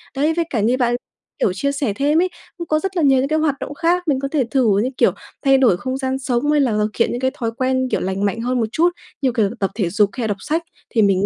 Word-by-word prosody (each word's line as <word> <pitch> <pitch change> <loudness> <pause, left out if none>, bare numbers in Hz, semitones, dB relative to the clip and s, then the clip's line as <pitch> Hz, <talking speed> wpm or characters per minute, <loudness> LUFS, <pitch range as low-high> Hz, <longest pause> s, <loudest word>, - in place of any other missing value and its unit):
Đấy 295 +4 +2
với 335 0 0
cả 235 - -1
như 230 +5 +2
bạn, 240 -2 +1 0.4
kiểu, 185 - +2
chia 280 +10 -1
sẻ 280 -7 -1
thêm 290 +8 +2
ấy, 370 - +1 0.3
cũng 340 -1 -6
có 310 0 +2
rất 385 +2 -4
là 335 - +2
nhiều 270 -2 +5
những 265 - +1
cái 310 +2 +1
hoạt 305 -3 +1
động 285 - -5
khác 345 +3 0
mình 275 -3 +2
có 275 - -2
thể 275 -1 +1
thử 235 -7 +3
như, 255 - 0
kiểu, - - +4 0.3
thay 270 0 +6
đổi 250 -9 +4
không 260 +6 -3
gian 265 0 -2
sống 260 +2 0
hay 295 -1 +3
là 255 - +2
thực 210 0 +1
hiện - - +3
những 240 - -3
cái 260 0 0
thói 230 -2 -3
quen, 260 0 +1
kiểu, - - +1
lành 190 +2 -1
mạnh 215 +3 -1
hơn 250 +1 0
một 225 - +2
chút, 340 +6 +3 0.3
như, 265 -2 +2
kiểu, 220 -5 +1
tập 195 - 0
thể 195 -6 0
dục 205 +2 +2
hay 250 - -4
là - - 0
đọc 205 -2 -2
sách 320 +11 -1 0.3
thì 225 - +2
mình 195 -1 +3
260 Hz, 300 wpm, -20 LUFS, 225-290 Hz, 0.4 s, thay